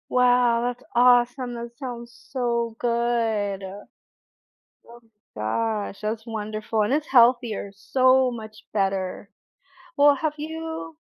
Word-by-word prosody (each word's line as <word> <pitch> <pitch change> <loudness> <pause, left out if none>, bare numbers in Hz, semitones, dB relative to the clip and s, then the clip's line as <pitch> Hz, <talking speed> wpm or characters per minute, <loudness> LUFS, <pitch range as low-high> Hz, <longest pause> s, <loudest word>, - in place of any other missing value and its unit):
Wow, 245 -1 +3
that's 245 +1 -3
awesome, 245 +1 +4
that 235 0 -6
sounds 240 -2 -7 0.2
so 235 -3 -1
good. 230 -4 0
Oh, 195 +2 -9 1.5
my 105 - -6 0.5
gosh, 195 - -17
that's 215 +1 -3
wonderful, 215 0 -3
and 210 - 0
it's 300 +1 0
healthier, 240 -5 +3
so 255 +5 +3
much 215 -2 -9 0.2
better. 195 -1 -2 0.7
Well, 285 0 +6
have 305 +2 -2
you 315 - -6
235 Hz, 115 wpm, -24 LUFS, 215-250 Hz, 1.5 s, Well